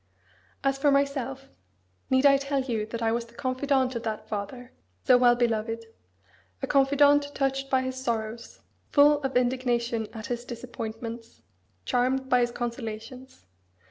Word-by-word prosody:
As 275 Hz, 0 st, +1 dB
for 290 Hz, -, +3 dB
myself 270 Hz, -1 st, 0 dB, 0.6 s
need 260 Hz, +1 st, +3 dB
I 275 Hz, -1 st, +7 dB
tell 275 Hz, 0 st, -1 dB
you 230 Hz, -5 st, -2 dB
that 230 Hz, +1 st, -5 dB
I 225 Hz, -, +2 dB
was 235 Hz, 0 st, -1 dB
the 235 Hz, -, -20 dB
confidant 260 Hz, 0 st, 0 dB
of 235 Hz, -, -2 dB
that 220 Hz, -2 st, -4 dB
father, 235 Hz, +5 st, -5 dB, 0.3 s
so 255 Hz, -, +7 dB
well 245 Hz, -1 st, +5 dB
beloved: 230 Hz, -1 st, -1 dB, 0.7 s
a -, -, -2 dB
confidant 285 Hz, +1 st, +3 dB
touched 270 Hz, 0 st, -1 dB
by 260 Hz, -1 st, +2 dB
his 260 Hz, 0 st, -4 dB
sorrows, 230 Hz, -1 st, -4 dB, 0.3 s
full 290 Hz, 0 st, +5 dB
of 270 Hz, -2 st, 0 dB
indignation 245 Hz, -3 st, 0 dB
at 220 Hz, -2 st, -8 dB
his 240 Hz, -2 st, -3 dB
disappointments, 230 Hz, -1 st, -7 dB, 0.4 s
charmed 260 Hz, +1 st, 0 dB
by 250 Hz, -, +4 dB
his 240 Hz, 0 st, +2 dB
consolations. 235 Hz, -, -6 dB
250 Hz, 145 wpm, -27 LUFS, 230-270 Hz, 0.7 s, I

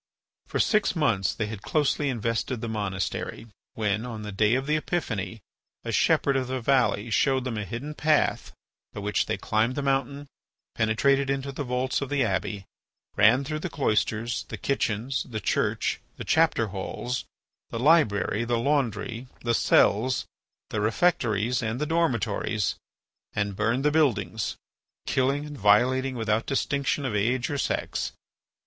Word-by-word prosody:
For -, -, -2 dB
six 210 Hz, -3 st, +2 dB
months 110 Hz, -, +2 dB
they 110 Hz, -, -1 dB
had 105 Hz, -1 st, -6 dB
closely 145 Hz, +1 st, +1 dB
invested 115 Hz, 0 st, -1 dB
the 115 Hz, -, -4 dB
monastery, 100 Hz, 0 st, -3 dB, 0.3 s
when, 105 Hz, -1 st, 0 dB
on 115 Hz, -3 st, -6 dB
the 105 Hz, -, -5 dB
day 105 Hz, +4 st, +3 dB
of 135 Hz, +1 st, -1 dB
the 150 Hz, +1 st, +1 dB
Epiphany, 115 Hz, -, -2 dB, 0.4 s
a -, -, -3 dB
shepherd 140 Hz, -, +3 dB
of 130 Hz, -1 st, 0 dB
the 130 Hz, 0 st, -2 dB
valley 120 Hz, -3 st, +2 dB
showed 130 Hz, +3 st, +2 dB
them 125 Hz, -3 st, -3 dB
a 105 Hz, -1 st, -3 dB
hidden 120 Hz, +10 st, -5 dB
path 150 Hz, 0 st, +1 dB, 0.4 s
by -, -, -6 dB
which 105 Hz, +1 st, 0 dB
they 110 Hz, -, -1 dB
climbed 110 Hz, +4 st, 0 dB
the 145 Hz, -, -2 dB
mountain, 135 Hz, +1 st, 0 dB, 0.5 s
penetrated 135 Hz, +5 st, +2 dB
into 135 Hz, 0 st, -1 dB
the 140 Hz, +1 st, -4 dB
vaults 125 Hz, +1 st, -1 dB
of 140 Hz, -, -3 dB
the 145 Hz, -2 st, +2 dB
abbey, 100 Hz, -1 st, -2 dB, 0.5 s
ran 110 Hz, +6 st, +5 dB
through 155 Hz, +2 st, -3 dB
the -, -, -4 dB
cloisters, 115 Hz, -2 st, 0 dB
the -, -, -7 dB
kitchens, 130 Hz, -1 st, -1 dB
the 110 Hz, -3 st, -3 dB
church, -, -, 0 dB, 0.2 s
the -, -, -5 dB
chapter 160 Hz, -9 st, +3 dB
halls, 110 Hz, +6 st, -4 dB, 0.4 s
the -, -, -4 dB
library, 115 Hz, -6 st, +3 dB
the 120 Hz, 0 st, 0 dB
laundry, 120 Hz, -2 st, -1 dB
the 120 Hz, -1 st, 0 dB
cells, 115 Hz, +3 st, +3 dB, 0.5 s
the 110 Hz, -, -1 dB
refectories, 115 Hz, -, +1 dB
and 110 Hz, +2 st, -2 dB
the 150 Hz, -, 0 dB
dormitories, 115 Hz, -, 0 dB, 0.6 s
and 100 Hz, -2 st, -1 dB
burned 115 Hz, +7 st, 0 dB
the 150 Hz, -, +4 dB
buildings, 110 Hz, -, +1 dB, 0.5 s
killing 135 Hz, +3 st, +1 dB
and 145 Hz, -2 st, -8 dB
violating 130 Hz, +6 st, +3 dB
without 110 Hz, -1 st, 0 dB
distinction 140 Hz, 0 st, 0 dB
of 115 Hz, -5 st, -1 dB
age 120 Hz, +6 st, +1 dB
or 145 Hz, -, -1 dB
sex. -, -, -2 dB
120 Hz, 155 wpm, -26 LUFS, 110-140 Hz, 0.6 s, ran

